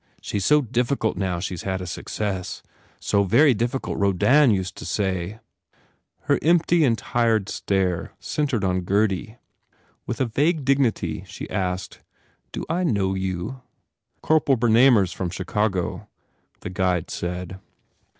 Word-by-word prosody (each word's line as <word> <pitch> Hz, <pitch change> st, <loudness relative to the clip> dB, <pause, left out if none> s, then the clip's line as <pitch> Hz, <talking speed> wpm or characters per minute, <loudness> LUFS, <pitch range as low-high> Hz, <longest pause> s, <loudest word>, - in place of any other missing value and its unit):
She -, -, -4 dB
s 100 Hz, -, -1 dB
so 150 Hz, -1 st, +4 dB
difficult 120 Hz, 0 st, 0 dB
now 95 Hz, -3 st, -2 dB
she 95 Hz, +1 st, -3 dB
s 85 Hz, -, -6 dB
had 95 Hz, -1 st, -2 dB
a 90 Hz, -, -5 dB
success. 95 Hz, +1 st, -4 dB, 0.4 s
So 100 Hz, 0 st, +1 dB
very 130 Hz, +9 st, +5 dB
difficult 120 Hz, +4 st, -2 dB
Rodin 120 Hz, +9 st, +4 dB
used 95 Hz, -5 st, 0 dB
to -, -, -8 dB
say 95 Hz, +1 st, -2 dB, 0.8 s
Her -, -, +1 dB
empty 170 Hz, +1 st, +3 dB
and 120 Hz, -5 st, +3 dB
tired 115 Hz, -5 st, 0 dB
stare 95 Hz, -3 st, -1 dB
centred 140 Hz, -8 st, -1 dB
on 90 Hz, -1 st, +1 dB
Gurdy. 100 Hz, +3 st, 0 dB, 0.7 s
With 120 Hz, -, -3 dB
a 130 Hz, -, +2 dB
vague 145 Hz, +6 st, 0 dB
dignity 115 Hz, -, +1 dB
she 90 Hz, -, -8 dB
asked, 90 Hz, -2 st, -3 dB, 0.5 s
"Do -, -, -5 dB
I 175 Hz, +3 st, -1 dB
know 100 Hz, -, +1 dB
you?" 95 Hz, +6 st, -4 dB, 0.6 s
"Corporal 150 Hz, -4 st, +3 dB
Bernamer 120 Hz, -1 st, +5 dB
s 90 Hz, -, -4 dB
from 90 Hz, -, -3 dB
Chicago," 95 Hz, +1 st, -2 dB, 0.5 s
the -, -, -6 dB
guide 90 Hz, -3 st, 0 dB
said. 90 Hz, +1 st, -5 dB
100 Hz, 140 wpm, -23 LUFS, 95-125 Hz, 0.8 s, very